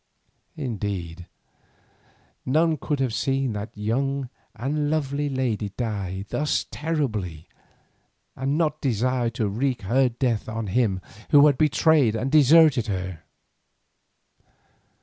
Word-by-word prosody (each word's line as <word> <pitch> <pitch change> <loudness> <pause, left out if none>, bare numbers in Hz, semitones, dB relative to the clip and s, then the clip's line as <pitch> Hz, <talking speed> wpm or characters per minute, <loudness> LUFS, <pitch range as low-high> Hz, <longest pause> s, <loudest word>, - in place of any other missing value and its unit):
Indeed 100 - -4 1.2
none 155 +4 +2
could 145 +1 -2
have 130 -4 0
seen 135 -1 0
that 105 0 -6
young 135 +5 -1 0.3
and 145 +5 -1
lovely 145 -1 -1
lady 120 -6 -1
die 100 -5 -3
thus 150 0 0
terribly 110 - -3 0.9
and 135 +3 -1
not 155 -2 0
desire 125 -1 0
to 115 -2 -2
wreak 120 +3 -1
her 125 +6 +2
death 120 -3 -1
on 110 0 -3
him 100 -2 0 0.3
who 145 -1 +7
had 145 -2 +5
betrayed 150 -5 +3
and 130 +5 -2
deserted 150 -4 +5
her. 95 -4 -4
125 Hz, 110 wpm, -24 LUFS, 105-145 Hz, 1.2 s, who